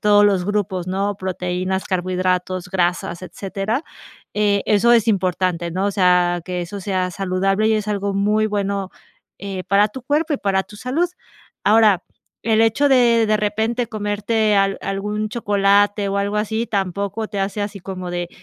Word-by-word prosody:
todos 205 0 +5
los 195 -3 +2
grupos, 200 -3 -1
¿no?, 195 +2 -1
proteínas, 185 0 -2
carbohidratos, 185 0 -1
grasas, 175 -2 -1
etcétera. 195 - -3 0.5
Eh, 205 -1 +1
eso 225 +3 +4
es 230 -1 +4
importante, 180 -3 0
¿no? 190 +4 -1
O - - +1
sea, 180 -2 +3
que 180 -1 -3
eso 195 +3 -7
sea 185 -2 -1
saludable 195 +3 0
y 220 - +3
es 215 -1 -1
algo 200 -1 -1
muy 210 +2 +2
bueno, 200 -2 -2 0.5
eh, 195 -2 -5
para 200 +2 +3
tu 260 +4 -9
cuerpo 300 +5 0
y 285 - +2
para 190 -1 +1
tu 210 - -14
salud. 270 +11 0 0.6
Ahora, 210 -3 +5 0.4
el 220 -1 +2
hecho 225 +6 +3
de 240 -4 +4
de 215 0 +3
repente 220 +3 -1
comerte 210 0 0
al 195 0 +2
algún 210 +2 -3
chocolate 205 -2 +2
o 195 - -1
algo 200 +1 -1
así, 220 +2 -1
tampoco 200 +2 -2
te 205 - -5
hace 195 +2 -2
así 205 0 -4
como 185 -1 -6
de: 175 -1 -3
200 Hz, 165 wpm, -20 LUFS, 185-215 Hz, 0.6 s, todos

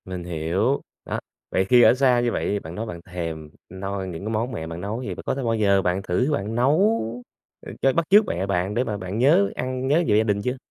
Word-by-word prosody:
Mình 90 -1 -6
hiểu. 90 - 0 0.2
Đó, - - -3 0.3
vậy 95 - +1
khi 125 +4 +5
ở - - +7
xa 130 -1 +3
như 120 -1 +1
vậy - - -2
thì 100 - 0
bạn 80 -2 -9
nói 110 - -3
bạn 85 -6 -7
thèm 80 -3 -6 0.2
noi 95 +1 -4
những 90 +1 -7
cái - - -2
món 115 +4 -1
mẹ 80 -9 -5
bạn 85 +1 -6
nấu, 105 +4 -3
vậy - - -4
có - - 0
bao 120 -4 -1
giờ 100 -3 +3
bạn 90 0 0
thử 110 +11 0
bạn 105 -2 -2
nấu, 160 - +3 0.7
ờ, - - -7
cho 135 - +3
bắt 170 +2 +1
chước 205 +2 +7
mẹ 90 +3 -2
bạn 95 0 -1
để 120 +3 +1
mà 110 -5 -3
bạn 95 +1 -5
nhớ 170 +10 +4
ăn 130 +1 -3
nhớ 155 +5 +3
về 105 - +3
gia 110 - +4
đình 105 -2 0
chưa? 125 +4 -2
105 Hz, 250 wpm, -23 LUFS, 90-125 Hz, 0.7 s, ở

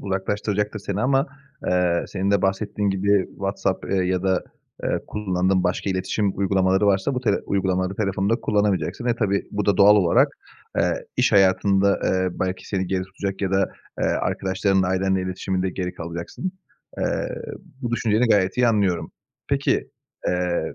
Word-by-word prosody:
uzaklaştıracaktır 105 +2 -2
seni 100 0 -3
ama, 135 +4 +2 0.4
eee, 90 -1 +2
senin 100 0 -1
de 100 - +2
bahsettiğin 100 +1 0
gibi, 95 0 +2
WhatsApp, 95 -1 -2
eee, 100 - +1
ya 90 0 0
da, 95 -1 +1 0.4
eee, - - 0
kullandığın 95 -2 0
başka 90 +2 0
iletişim 95 +2 -1
uygulamaları 95 0 +2
varsa 100 +7 +2
bu 125 - -1
tele 110 -5 +2
uygulamaları 95 -1 0
telefonda 100 +1 +1
kullanamayacaksın. 105 0 0
Ve 120 - +2
tabii 100 -3 0
bu 105 -1 -2
da 100 - +3
doğal 105 +1 +7
olarak, 90 -5 +4 0.5
eee, - - 0
iş - - +2
hayatında, 100 0 +4
eee, 95 0 +1
belki 95 0 -2
seni 95 -2 -1
geri 95 0 -1
tutacak 95 +1 -5
ya 95 - 0
da, 95 0 +2 0.3
eee, - - +2
arkadaşlarınla, 95 0 +1
ailenle 95 0 +1
iletişiminde 95 0 -2
geri 90 -1 -4
kalacaksın. 85 - -5 0.5
Eee, - - -1 0.5
bu 120 - -2
düşünceni 115 0 +2
gayet 95 -1 +3
iyi 125 -1 +4
anlıyorum. 100 -6 +1 0.4
Peki, - - 0 0.4
eee, 90 -1 -1
95 Hz, 155 wpm, -23 LUFS, 95-105 Hz, 0.5 s, doğal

